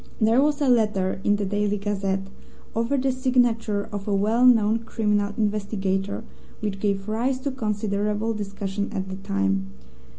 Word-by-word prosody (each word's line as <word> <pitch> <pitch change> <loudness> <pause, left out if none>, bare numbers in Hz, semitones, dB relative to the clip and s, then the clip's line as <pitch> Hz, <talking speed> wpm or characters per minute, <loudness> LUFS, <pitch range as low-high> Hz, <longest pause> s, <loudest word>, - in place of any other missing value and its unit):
There 225 +3 +4
was 295 0 +2
a 285 - +3
letter 210 -6 +2
in 205 - +3
the 205 0 -1
Daily 205 +1 0
Gazette, 195 -1 -1 0.5
over 230 +5 +1
the 265 0 +1
signature 245 -5 +1
of 205 -1 -5
a 205 - +1
well 220 +5 +3
known 225 -2 +5
criminal 210 -3 0
investigator, 200 -2 -1 0.4
which 205 -3 -3
gave 195 -1 -1
rise 240 +5 0
to 280 - -2
considerable 210 -2 -1
discussion 200 -1 -3
at 190 -2 -3
the 190 - -5
time. 95 - -1
210 Hz, 155 wpm, -24 LUFS, 195-225 Hz, 0.5 s, known